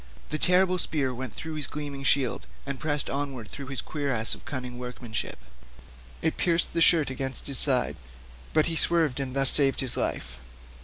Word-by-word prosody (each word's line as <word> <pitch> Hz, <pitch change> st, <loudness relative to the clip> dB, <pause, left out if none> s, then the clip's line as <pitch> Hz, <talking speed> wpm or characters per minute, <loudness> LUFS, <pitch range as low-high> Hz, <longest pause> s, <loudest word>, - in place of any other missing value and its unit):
The 155 Hz, -, -2 dB
terrible 180 Hz, 0 st, +3 dB
spear 140 Hz, -6 st, -2 dB
went 130 Hz, +1 st, -7 dB
through 160 Hz, 0 st, -7 dB
his 150 Hz, -3 st, -2 dB
gleaming 145 Hz, -2 st, -6 dB
shield, 135 Hz, -2 st, 0 dB, 0.2 s
and 140 Hz, -2 st, -5 dB
pressed 145 Hz, -2 st, -2 dB
onward 135 Hz, -6 st, -5 dB
through 140 Hz, -2 st, -8 dB
his 135 Hz, -1 st, -5 dB
cuirass 135 Hz, -7 st, -1 dB
of -, -, -11 dB
cunning 125 Hz, -2 st, -6 dB
workmanship; 125 Hz, -2 st, -6 dB, 0.9 s
it 160 Hz, -, -1 dB
pierced 170 Hz, -1 st, +1 dB
the 165 Hz, -, -1 dB
shirt 160 Hz, -5 st, +4 dB
against 130 Hz, 0 st, -3 dB
his 140 Hz, -3 st, +3 dB
side, 130 Hz, -3 st, +2 dB, 0.5 s
but 155 Hz, -1 st, +2 dB
he 165 Hz, -, -2 dB
swerved 160 Hz, -5 st, +1 dB
and 135 Hz, -1 st, -5 dB
thus 135 Hz, -1 st, +7 dB
saved 135 Hz, -2 st, +8 dB
his 130 Hz, -3 st, +3 dB
life. -, -, -4 dB
140 Hz, 175 wpm, -26 LUFS, 130-155 Hz, 0.9 s, saved